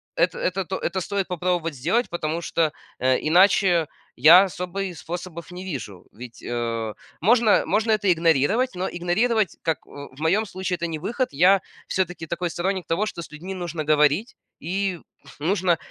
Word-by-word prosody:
это 175 Hz, +1 st, +1 dB
это 185 Hz, +1 st, -1 dB
то 190 Hz, +2 st, -3 dB
это 190 Hz, +2 st, -2 dB
стоит 195 Hz, +1 st, -2 dB
попробовать 175 Hz, -2 st, -1 dB
сделать, 180 Hz, -, 0 dB
потому 170 Hz, -1 st, -2 dB
что, 165 Hz, -2 st, 0 dB, 0.3 s
э, 130 Hz, 0 st, +3 dB
иначе 180 Hz, -1 st, +4 dB, 0.3 s
я 170 Hz, +9 st, +8 dB
особый 180 Hz, 0 st, -4 dB
способов 170 Hz, +1 st, -7 dB
не 180 Hz, +1 st, -7 dB
вижу. 130 Hz, -, -7 dB
Ведь, 120 Hz, +1 st, -11 dB
э, 115 Hz, -2 st, -3 dB, 0.3 s
можно 225 Hz, +2 st, +4 dB
можно 215 Hz, +6 st, +1 dB
это 205 Hz, -3 st, +3 dB
игнорировать, 170 Hz, -, +2 dB
но 185 Hz, +1 st, -2 dB
игнорировать, 205 Hz, +5 st, 0 dB
как, 160 Hz, -2 st, -2 dB
о 145 Hz, 0 st, -10 dB
в -, -, -15 dB
моём 190 Hz, +8 st, +2 dB
случае, 185 Hz, -1 st, -3 dB
это 170 Hz, -, 0 dB
не 160 Hz, -1 st, -4 dB
выход. 240 Hz, -, -1 dB
Я 180 Hz, +7 st, +5 dB, 0.3 s
всё-таки 180 Hz, -3 st, -2 dB
такой 170 Hz, +2 st, -3 dB
сторонник 185 Hz, +2 st, -2 dB
того, 170 Hz, +6 st, +1 dB
что 170 Hz, -5 st, -5 dB
с -, -, -11 dB
людьми 180 Hz, +5 st, -7 dB
нужно 170 Hz, -4 st, -4 dB
говорить 150 Hz, -, +3 dB, 0.3 s
и 185 Hz, +1 st, -1 dB, 0.4 s
нужно, 175 Hz, +2 st, +1 dB
175 Hz, 165 wpm, -24 LUFS, 160-195 Hz, 0.4 s, я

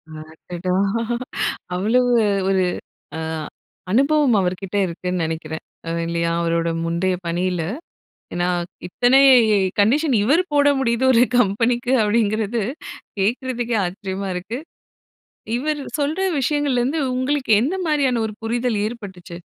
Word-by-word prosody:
அடடா! 170 Hz, +3 st, -6 dB, 1.0 s
அவ்வளவு 245 Hz, +7 st, +2 dB, 0.4 s
ஒரு 190 Hz, -1 st, +2 dB, 0.5 s
அ -, -, -4 dB, 0.7 s
அனுபவம் 280 Hz, +2 st, +3 dB
அவர்கிட்ட 185 Hz, +1 st, -2 dB
இருக்குன்னு 180 Hz, +1 st, -3 dB
நினைக்கிறேன். 160 Hz, 0 st, -5 dB, 0.2 s
அ -, -, -2 dB, 0.2 s
இல்லையா, 170 Hz, 0 st, -1 dB
அவரோட 170 Hz, 0 st, 0 dB, 0.2 s
முந்தைய 170 Hz, +3 st, 0 dB
பணியில 175 Hz, +1 st, -1 dB, 0.7 s
ஏனா, 175 Hz, 0 st, 0 dB, 0.4 s
இத்தனை 245 Hz, +8 st, +3 dB, 0.6 s
கண்டிஷன் 265 Hz, +8 st, +3 dB
இவர் 290 Hz, -, +3 dB
போட 285 Hz, -1 st, +4 dB
முடியுது 235 Hz, -1 st, +1 dB
ஒரு 235 Hz, -, +5 dB
கம்பெனிக்கு 240 Hz, +3 st, +1 dB
அப்படிங்கிறது, 215 Hz, +1 st, +1 dB, 0.6 s
கேக்றதுக்கே 240 Hz, +3 st, -1 dB
ஆச்சரியமா 190 Hz, +2 st, -4 dB
இருக்கு. 185 Hz, +6 st, -5 dB, 1.0 s
இவரு 295 Hz, +2 st, -2 dB, 0.2 s
சொல்ற 300 Hz, +6 st, -1 dB, 0.2 s
விஷயங்கள்லருந்து 280 Hz, 0 st, 0 dB
உங்களுக்கு 260 Hz, 0 st, -1 dB
எந்த 295 Hz, +10 st, 0 dB
மாரியான 275 Hz, -6 st, +1 dB
ஒரு 215 Hz, -, -5 dB
புரிதல் 235 Hz, 0 st, -1 dB
ஏற்பட்டுச்சு? 190 Hz, -6 st, -7 dB
225 Hz, 105 wpm, -21 LUFS, 180-255 Hz, 1.0 s, ஒரு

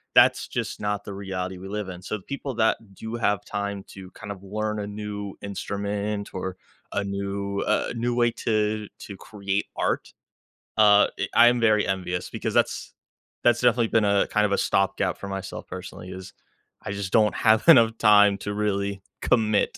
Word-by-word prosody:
that's -, -, +5 dB
just -, -, -4 dB
not 105 Hz, -1 st, -2 dB
the 100 Hz, -, -7 dB
reality 95 Hz, -1 st, -4 dB
we 95 Hz, +2 st, -9 dB
live 105 Hz, 0 st, -4 dB
in. 90 Hz, -1 st, -8 dB
So 105 Hz, +3 st, -3 dB
people 140 Hz, -1 st, -4 dB
that 110 Hz, -1 st, +3 dB, 0.2 s
do 110 Hz, +4 st, -6 dB
have 105 Hz, -3 st, 0 dB
time 100 Hz, -1 st, -3 dB
to 95 Hz, -1 st, -11 dB
kind 105 Hz, -2 st, -8 dB
of 100 Hz, -1 st, -9 dB
learn 110 Hz, +2 st, -3 dB
a 105 Hz, -, -3 dB
new 105 Hz, -1 st, -5 dB
instrument 100 Hz, +1 st, -3 dB
or 95 Hz, 0 st, -4 dB, 0.4 s
a 100 Hz, -, -1 dB
new, 100 Hz, 0 st, -3 dB
uh, 110 Hz, -, +1 dB
new 120 Hz, +1 st, -1 dB
way 120 Hz, -1 st, +3 dB
to 105 Hz, -1 st, -1 dB
to 100 Hz, -, -9 dB
create 100 Hz, 0 st, -3 dB
art, -, -, -1 dB, 0.6 s
uh, 105 Hz, -1 st, +6 dB, 0.3 s
i 120 Hz, -, +7 dB
I -, -, +8 dB
am 120 Hz, 0 st, +4 dB
very 110 Hz, -2 st, +3 dB
envious 90 Hz, -2 st, -2 dB
because -, -, -3 dB
that's -, -, 0 dB, 0.5 s
that's 120 Hz, -1 st, +4 dB
definitely 120 Hz, -2 st, +3 dB
been 110 Hz, 0 st, +2 dB
a 100 Hz, -1 st, +3 dB
kind 105 Hz, 0 st, +2 dB
of 105 Hz, -, -1 dB
a 100 Hz, -, +2 dB
stopgap 95 Hz, -1 st, +1 dB
for 100 Hz, -, -7 dB
myself 95 Hz, 0 st, -6 dB
personally 90 Hz, 0 st, -8 dB
is 95 Hz, 0 st, -9 dB, 0.5 s
I 105 Hz, -, -4 dB
just 100 Hz, -1 st, -4 dB
don't 110 Hz, -2 st, +4 dB
have 110 Hz, 0 st, +4 dB
enough 115 Hz, -7 st, +7 dB
time 105 Hz, -2 st, +6 dB
to 105 Hz, -, -4 dB
really 100 Hz, -1 st, -1 dB, 0.2 s
commit 110 Hz, -4 st, +2 dB
100 Hz, 180 wpm, -25 LUFS, 100-110 Hz, 0.6 s, I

